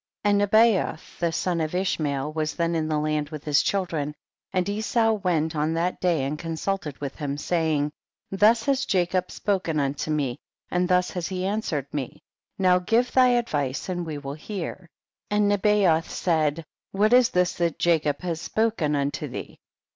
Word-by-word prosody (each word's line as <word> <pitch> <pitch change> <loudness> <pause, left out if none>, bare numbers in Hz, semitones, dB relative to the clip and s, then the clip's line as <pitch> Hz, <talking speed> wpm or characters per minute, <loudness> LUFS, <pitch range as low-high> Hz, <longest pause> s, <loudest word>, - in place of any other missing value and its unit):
20. 205 - +3
And - - +4
Nebayoth, 220 -7 +2
the 170 -1 +1
son 170 0 -1
of 155 +2 -2
Ish 185 -1 0
mael, 145 -1 -2
was 155 -1 -2
then 170 -1 0
in 160 -2 0
the 155 -1 0
land 150 0 -1
with 155 -2 -7
his 150 -2 +3
children, 165 -7 -1 0.4
and 185 0 0
Esau 220 +2 +1
went 175 -6 0
on 155 +2 0
that 175 +2 -1
day 170 -6 +2
and 145 +3 -3
consulted 165 -1 -3
with 140 -1 -5
him, 145 -2 -3
saying, 155 -2 0 0.4
21. 195 - -6
Thus 225 +2 +5
has 275 0 +1
Jacob 180 -1 +1
spoken 185 -6 -1
unto 140 +2 -2
me, 140 -5 -1 0.3
and 180 +1 +1
thus 180 0 +2
has 175 -2 -3
he 185 -1 -3
answered 195 - -1
me, 140 -4 -5 0.3
now 185 -1 +4
give 230 +7 +1
thy 255 -1 +5
advice 155 - 0
and 175 -1 -2
we 155 -3 -5
will 140 -1 -6
hear. 175 +2 -6 0.4
22. 210 - -1
And 210 0 +3
Nebayoth 200 -5 +3
said, 160 -2 0 0.3
what 210 +4 +2
is 250 -1 +6
this 180 0 +1
that 170 -1 0
Jacob 155 -4 +1
hath 170 -3 -3
spoken 180 -5 0
unto 140 0 -2
thee - - -8
170 Hz, 185 wpm, -25 LUFS, 150-195 Hz, 0.4 s, is